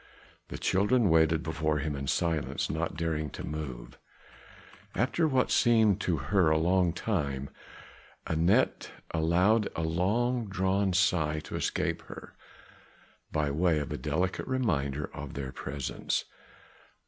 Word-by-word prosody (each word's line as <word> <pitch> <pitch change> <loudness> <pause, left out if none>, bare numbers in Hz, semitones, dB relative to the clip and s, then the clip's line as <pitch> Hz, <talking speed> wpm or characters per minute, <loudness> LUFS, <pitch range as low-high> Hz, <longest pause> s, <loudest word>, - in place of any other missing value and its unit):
The - - -6
children 105 +1 +2
waited 80 0 +3
before 80 -1 -1
him 75 +1 -2
in 70 0 -5
silence, 80 -1 -1
not 80 0 -3
daring 80 -2 -1
to - - -6
move. 70 -6 -6 1.0
After 135 - +1
what 130 -4 +1
seemed 110 -4 +4
to 90 -4 0
her 85 +5 +2
a 80 - +3
long 90 +2 +2
time, 70 -8 -2 0.7
Anat 85 +10 +2 0.2
allowed 90 +7 +2
a 80 - -2
long 110 +9 0
drawn 95 0 +1
sigh 90 -5 +2
to - - -8
escape - - -1
her, - - -10 1.0
by 75 -2 0
way 80 +2 +2
of 75 -2 -3
a - - -2
delicate 80 +8 -1
reminder 75 - 0
of 70 -2 -7
their 70 -2 -4
presence. 70 0 -3
80 Hz, 130 wpm, -29 LUFS, 75-100 Hz, 1.0 s, seemed